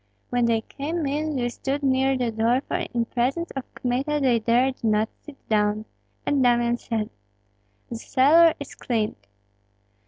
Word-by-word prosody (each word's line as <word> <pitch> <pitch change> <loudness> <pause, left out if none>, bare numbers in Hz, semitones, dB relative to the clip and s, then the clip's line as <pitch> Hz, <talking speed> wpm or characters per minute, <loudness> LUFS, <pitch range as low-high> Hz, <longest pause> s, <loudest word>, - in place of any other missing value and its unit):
When 245 -1 +2
they 230 -1 +2
came 305 +7 -4
in 300 +2 -1
they 245 -2 0
stood 275 +4 -3
near 265 0 +2
the 245 -2 -1
door, 230 +4 +2
for - - -3
in 235 -1 0
presence 260 +9 -1
of 270 -2 -5
Kmita 265 +4 -1
they 255 -4 +3
dared 245 +4 +1
not 215 0 +2
sit 295 -2 -12
down; 210 0 +1 0.4
and 285 -2 +2
Damian 240 -1 +3
said, 220 -2 -3 0.8
"The 235 - -5
cellar 310 +8 +5
is 285 - -8
cleared." 220 -3 -1
250 Hz, 155 wpm, -24 LUFS, 230-275 Hz, 0.8 s, cellar